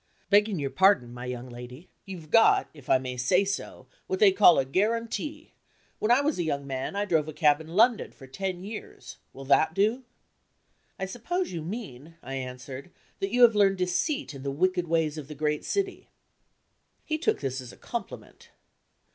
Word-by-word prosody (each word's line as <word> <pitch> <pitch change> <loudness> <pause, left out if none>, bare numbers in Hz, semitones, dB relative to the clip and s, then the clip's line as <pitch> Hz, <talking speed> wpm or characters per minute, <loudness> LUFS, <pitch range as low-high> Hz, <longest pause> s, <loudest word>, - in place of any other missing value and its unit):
"Begging 205 -1 +4
your 140 -3 -3
pardon, 190 -11 +3
my 120 0 -7
young 125 0 -5
lady, 125 +6 -10 0.2
you've 170 -5 -9
got 225 0 +5
(if 145 -5 -15
I - - +6
may 130 -1 -6
say 180 +11 +2
so) 200 - -5 0.2
what 380 - -1
they 405 -1 +6
call 180 - +6
a 135 - +2
guarantee. 230 - -2 0.5
When 215 - -1
I 245 +3 +5
was 290 -6 -1
a - - +1
young 140 -3 -2
man, 135 +6 -4
I 205 +1 0
drove 160 -6 +1
a 155 - -6
cab 150 -1 +3
in 160 - -11
London 220 +7 +2
for 135 - -14
ten 180 +7 -4
years. 210 +2 -9
Will 135 - -10
that 145 +3 +3
do?" 220 +6 +1 0.9
"I 190 - -3
suppose 350 - -3
you 170 -3 -4
mean," 165 - -7
I 135 - -7
answered, 130 +2 -7 0.3
"that 195 - -1
you 245 +1 +4
have 235 -2 +8
learned 200 -2 +3
deceit 185 - -1
in 135 - -9
the 140 - -3
wicked 180 +4 0
ways 160 -2 0
of 145 - -9
the 150 - -8
great 150 0 -1
city." 390 -1 -3 1.0
He 310 0 -2
took 335 - +1
this 135 -1 -3
as 125 - -10
a - - -16
compliment. - - -8
175 Hz, 190 wpm, -27 LUFS, 135-215 Hz, 1.0 s, have